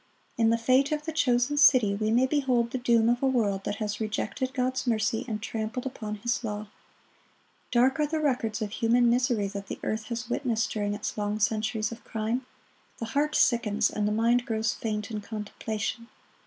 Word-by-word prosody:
In 225 Hz, -1 st, +3 dB
the 230 Hz, -, +3 dB
fate 255 Hz, +5 st, +3 dB
of 300 Hz, 0 st, -2 dB
the 320 Hz, -, -2 dB
chosen 255 Hz, -2 st, +1 dB
city 255 Hz, -8 st, +6 dB
we 215 Hz, +2 st, -1 dB
may 240 Hz, +4 st, +4 dB
behold 255 Hz, -4 st, +1 dB
the 260 Hz, -, -2 dB
doom 235 Hz, -2 st, +3 dB
of 240 Hz, +1 st, +2 dB
a 270 Hz, -, +3 dB
world 205 Hz, -7 st, 0 dB
that 205 Hz, -, -2 dB
has 210 Hz, -1 st, -3 dB
rejected 220 Hz, +4 st, -2 dB
God's 255 Hz, -1 st, -1 dB
mercy 220 Hz, -1 st, 0 dB
and 215 Hz, -3 st, -3 dB
trampled 225 Hz, +3 st, -3 dB
upon 215 Hz, -5 st, -4 dB
His 235 Hz, +4 st, -2 dB
law. 210 Hz, -1 st, -4 dB, 1.0 s
Dark 255 Hz, +4 st, +3 dB
are 300 Hz, -, +2 dB
the 315 Hz, +1 st, -1 dB
records 245 Hz, -7 st, 0 dB
of 205 Hz, -, -4 dB
human 235 Hz, +2 st, +3 dB
misery 240 Hz, -4 st, +1 dB
that 200 Hz, -1 st, -7 dB
earth 220 Hz, 0 st, -2 dB
has 235 Hz, +1 st, -4 dB
witnessed 235 Hz, -4 st, -1 dB
during 205 Hz, -1 st, -1 dB
its 210 Hz, +1 st, -4 dB
long 210 Hz, +1 st, -1 dB
centuries 220 Hz, +1 st, 0 dB
of 230 Hz, +1 st, -9 dB
crime. 230 Hz, +4 st, -3 dB, 0.5 s
The 230 Hz, -, -4 dB
heart 300 Hz, +2 st, +1 dB
sickens 225 Hz, -3 st, +2 dB
and 210 Hz, -1 st, -1 dB
the -, -, 0 dB
mind 230 Hz, +3 st, +2 dB
grows 220 Hz, 0 st, 0 dB
faint 210 Hz, -1 st, -4 dB
in 210 Hz, -1 st, -3 dB
contemplation. 220 Hz, +2 st, -4 dB
230 Hz, 190 wpm, -27 LUFS, 215-250 Hz, 1.0 s, city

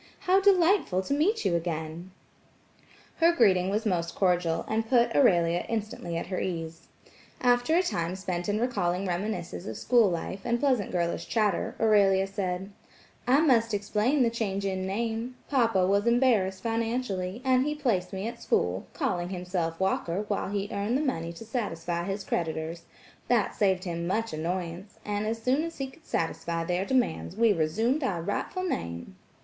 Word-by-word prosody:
How 380 Hz, +1 st, +3 dB
delightful 365 Hz, -, +3 dB
to 280 Hz, -, -2 dB
meet 385 Hz, +11 st, +1 dB
you 175 Hz, -, +2 dB
again." 165 Hz, +1 st, -3 dB, 1.1 s
Her 335 Hz, +1 st, +5 dB
greeting 190 Hz, -, +3 dB
was 210 Hz, +3 st, -1 dB
most 170 Hz, -4 st, -1 dB
cordial, 175 Hz, -3 st, +1 dB
and 225 Hz, +1 st, -1 dB
put 240 Hz, -2 st, +3 dB
Aurelia 175 Hz, -9 st, +4 dB
instantly 210 Hz, -6 st, -3 dB
at -, -, -3 dB
her 185 Hz, -, -3 dB
ease. 165 Hz, -2 st, -4 dB, 0.5 s
After 245 Hz, +5 st, +3 dB
a 360 Hz, -, +4 dB
time 175 Hz, -, -2 dB
spent 180 Hz, -1 st, -3 dB
in 205 Hz, +1 st, +1 dB
recalling 195 Hz, -7 st, 0 dB
reminiscences 175 Hz, -, -3 dB
of 110 Hz, -, -5 dB
school 235 Hz, -4 st, +4 dB
life, 175 Hz, +2 st, -3 dB
and 240 Hz, 0 st, 0 dB
pleasant 255 Hz, -7 st, +1 dB
girlish 170 Hz, -1 st, -1 dB
chatter, 210 Hz, -5 st, 0 dB
Aurelia 200 Hz, -3 st, +4 dB
said: 195 Hz, 0 st, -3 dB, 0.6 s
"I 270 Hz, +4 st, +5 dB
must 230 Hz, -8 st, +3 dB
explain 210 Hz, +7 st, +1 dB
the 235 Hz, -, +2 dB
change 200 Hz, -4 st, -2 dB
in 190 Hz, -1 st, -2 dB
name,–papa 230 Hz, 0 st, 0 dB
was 200 Hz, +4 st, +2 dB
embarrassed 225 Hz, -6 st, +2 dB
financially, 225 Hz, -4 st, -2 dB
and 255 Hz, -1 st, +4 dB
he 300 Hz, +2 st, -1 dB
placed 220 Hz, -11 st, 0 dB
me 195 Hz, +2 st, -3 dB
at 235 Hz, -, -7 dB
school, -, -, 0 dB
calling 180 Hz, -, -1 dB
himself 180 Hz, -3 st, -3 dB
Walker 190 Hz, 0 st, 0 dB
while 200 Hz, -2 st, -1 dB
he 200 Hz, 0 st, -2 dB
earned 205 Hz, +5 st, 0 dB
the -, -, -1 dB
money 170 Hz, -, -2 dB
to 195 Hz, +7 st, -10 dB
satisfy 175 Hz, -7 st, -3 dB
his 195 Hz, +1 st, -3 dB
creditors; 165 Hz, -1 st, -3 dB, 0.4 s
that 235 Hz, -4 st, +2 dB
saved 190 Hz, -3 st, +2 dB
him 170 Hz, -1 st, -3 dB
much 225 Hz, +3 st, -1 dB
annoyance, 175 Hz, +4 st, -4 dB
and 210 Hz, 0 st, -2 dB
as 225 Hz, +1 st, -2 dB
soon 260 Hz, +5 st, +2 dB
as 330 Hz, 0 st, -5 dB
he 275 Hz, -, -2 dB
could 320 Hz, +2 st, -21 dB
satisfy 165 Hz, 0 st, -2 dB
their 180 Hz, +3 st, -1 dB
demands, 245 Hz, -8 st, 0 dB
we 225 Hz, -1 st, +4 dB
resumed 220 Hz, -, 0 dB
our 175 Hz, -10 st, -1 dB
rightful 205 Hz, -, -2 dB
name." 85 Hz, -, -4 dB
200 Hz, 165 wpm, -28 LUFS, 175-240 Hz, 1.1 s, Her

